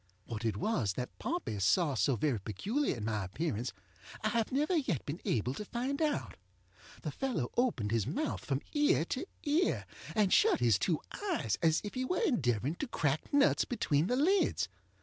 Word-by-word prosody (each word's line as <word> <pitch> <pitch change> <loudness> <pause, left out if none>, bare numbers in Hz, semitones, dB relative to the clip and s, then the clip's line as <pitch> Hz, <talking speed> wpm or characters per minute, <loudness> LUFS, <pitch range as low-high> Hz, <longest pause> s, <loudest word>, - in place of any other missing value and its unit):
What 115 -1 -5
it 110 -3 0
was 110 - 0
that 125 +5 -6
Pompey 330 - -2
saw 145 - +3
so 135 0 +2
very 120 0 0
peculiar 190 - -1
in 105 - -4
my 110 -2 -1
appearance 120 - -2 0.5
I 215 - +2
have 230 -1 0
never 300 +7 +1
yet 255 - 0
been 150 +5 -5
able 120 +3 0
to 210 - -5
find 255 +7 -2
out. 300 -2 -1 0.7
The - - -2
fellow 255 - -2
opened 215 - +1
his 115 -3 +1
mouth 305 +2 -2
from 135 0 -1
ear 295 - +3
to 260 - -3 0.2
ear, 310 +5 +1 0.3
and 210 -4 +3
shut - - +5
his 115 -5 +4
two 160 - +1 0.3
eyes - - -1
as 160 -2 +3
if 205 - -5
he 255 - -1
were 360 +8 0
endeavoring 140 - +1
to 285 - -3
crack 150 - -1
nuts 285 0 +4
between 165 - +1
the 250 - +1
lids. 365 +9 +2
170 Hz, 185 wpm, -33 LUFS, -, 0.7 s, shut